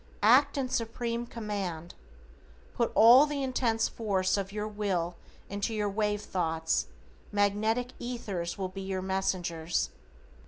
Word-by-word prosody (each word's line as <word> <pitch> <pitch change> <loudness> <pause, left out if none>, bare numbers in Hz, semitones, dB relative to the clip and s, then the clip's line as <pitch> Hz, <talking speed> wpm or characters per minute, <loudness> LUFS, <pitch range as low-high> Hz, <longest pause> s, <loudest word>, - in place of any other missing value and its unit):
Act 255 +7 +5
in 265 -2 0
Supreme 235 0 -2
command. 195 -8 -4 0.8
Put 235 - 0
all 245 +6 +8
the 290 -2 -2
intense 235 -4 +1
force 195 -4 0
of 195 -1 -3
your 210 +1 -3
WILL 190 -5 -2 0.3
into 205 +3 -2
your 210 -1 0
wave 210 0 0
thoughts, 160 -3 -1 0.4
magnetic 215 +4 +1
ethers 200 -8 -4
will 190 -2 -2
be 195 +1 -7
your 190 -1 -3
messengers. 175 -3 -1
205 Hz, 125 wpm, -29 LUFS, 185-230 Hz, 0.8 s, all